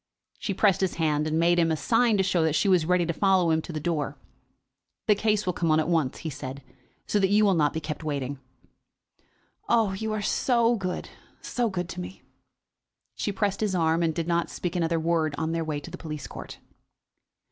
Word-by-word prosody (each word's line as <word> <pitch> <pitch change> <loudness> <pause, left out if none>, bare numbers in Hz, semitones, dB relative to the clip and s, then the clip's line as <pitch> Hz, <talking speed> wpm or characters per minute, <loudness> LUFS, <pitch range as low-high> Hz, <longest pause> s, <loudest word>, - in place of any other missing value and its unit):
She 200 -4 -3
pressed 195 -1 +3
his 190 -2 0
hand, 155 -2 +1
and 155 0 0
made 175 +1 +3
him 165 -1 +3
a 160 - 0
sign 225 +3 +2
to 190 - +3
show 185 -2 +1
that 160 -1 +1
she 160 - +2
was 180 -5 +3
ready 180 -1 +3
to 170 - -1
follow 190 -2 +3
him 160 0 +2
to 170 - -8
the 155 - -3
door. 150 -3 -2 0.9
"The 210 - +5
case 210 0 +1
will 180 - 0
come 170 -1 -1
on 155 0 +4
at 155 - 0
once," 160 -7 +1
he - - -1
said, 135 -1 -7 0.4
"so 210 - +1
that 195 - +3
you 210 +1 +4
will 195 - +4
not 150 -4 +2
be 160 - -3
kept 155 0 -6
waiting." 140 -2 -3 1.3
"Oh, 225 -4 +3
you 220 +3 -3
are 210 -1 -2
so 235 +2 +2
good; 185 -4 -4 0.3
so 240 -2 -1
good 180 -3 -3
to - - -5
me." 90 +2 -9 0.9
She - - -2
pressed 200 0 -1
his 205 -3 0
arm, 165 -1 +2
and 165 -1 +2
did 165 +1 -3
not 170 -1 +1
speak 180 -1 -4
another 165 -1 +1
word 160 -2 0
on 160 0 -1
their 165 0 -1
way 155 -2 -3
to 145 - -10
the - - -8
police 150 -3 -6
court. - - -9
170 Hz, 220 wpm, -26 LUFS, 155-195 Hz, 1.3 s, The